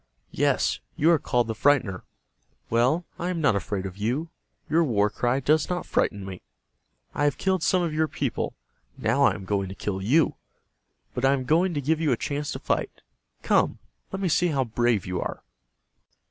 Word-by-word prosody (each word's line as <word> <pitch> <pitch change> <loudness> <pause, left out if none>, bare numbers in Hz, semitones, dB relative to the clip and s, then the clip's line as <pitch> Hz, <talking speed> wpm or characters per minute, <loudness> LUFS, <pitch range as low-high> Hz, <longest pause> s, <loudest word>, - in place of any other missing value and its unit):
Yes, - - +1 0.2
you 160 +3 +4
are 165 - +4
called 120 -2 +1
'The 115 - -2
Frightener.' 115 -8 +2 0.7
Well, 130 +9 +2
I 175 - -2
am 180 -2 -2
not 145 -9 +3
afraid 100 0 -2
of 95 0 -6
you. 125 +11 -1 0.4
Your 165 +2 +3
war 105 -7 +2
cry 125 +2 0
does 150 +3 +2
not 180 0 -2
frighten 100 -2 0
me. 95 -2 -8 0.7
I 145 - 0
have 145 - +1
killed 190 -2 +1
some 180 +2 +2
of 165 -3 -2
your 155 +1 +1
people. - - -3 0.4
Now - - +2
I - - +3
am 95 - -8
going 100 -1 -1
to 95 - -7
kill 95 -1 -3
you. 145 +11 +2 0.8
But 125 - -4
I 135 +1 +5
am 130 -2 -2
going 170 +5 +2
to 145 - -1
give 155 +3 +1
you 155 - +2
a 120 - +2
chance 145 +2 -3
to - - -4
fight. - - -2 0.4
Come, - - +2 0.3
let 190 - -4
me 195 - 0
see 175 +2 +3
how 140 -5 +1
brave 120 -3 +1
you 90 0 -2
are." - - -5
135 Hz, 195 wpm, -26 LUFS, 105-160 Hz, 0.8 s, I